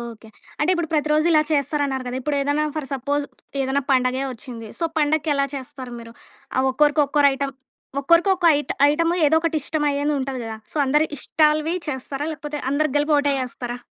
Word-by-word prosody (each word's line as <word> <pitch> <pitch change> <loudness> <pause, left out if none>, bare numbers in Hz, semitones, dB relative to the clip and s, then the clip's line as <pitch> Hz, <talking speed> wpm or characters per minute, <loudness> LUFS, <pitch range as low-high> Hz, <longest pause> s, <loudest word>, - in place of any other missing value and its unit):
Okay. 230 -2 -9 0.3
అంటే 300 - +2
ఇప్పుడు 345 -2 -2
ప్రతిరోజు 305 +1 +2
ఇలా 310 - +6
చేస్తరన్నారు 280 -2 0
గదా! 250 - -3
ఇప్పుడేదైనా 285 +2 0
ఫర్ 305 -3 -3
సపోజ్ 285 +2 -1 0.4
ఏదైనా 270 +1 0
పండగే 255 0 +2
వచ్చింది. 230 -1 -9
సో 335 - -1
పండక్కేలా 295 -2 +1
చేస్తారు 260 -2 -7
మీరు? 230 0 -11 0.4
ఆహ్, 260 +1 +3
ఒక్కోరికి 295 +2 +3
ఒక్కోరు 285 0 +4
ఐటెమ్ 275 0 -3 0.5
ఒక్కరికి 335 +7 +4
ఒక్కో 360 -2 0
ఐ 290 - +1 0.3
ఐటెమ్ 330 +3 +1 0.2
ఏదో 310 +2 +4
ఒకటిష్టం 310 -2 -1
అయ్యేదుంటది 280 -2 -1
గదా! 225 -1 -5 0.2
సో - - -11
అందరి 300 +3 +3
ఇష్టాలువి 310 +3 +2
చేస్తారా? 270 +1 -4
లేకపోతే 300 -1 -6
అందరికి 285 0 0
కలిపి 295 +1 +1
ఒకటే 285 0 +2
చేస్తారా? 245 -1 -5
285 Hz, 165 wpm, -22 LUFS, 265-305 Hz, 0.5 s, ఇలా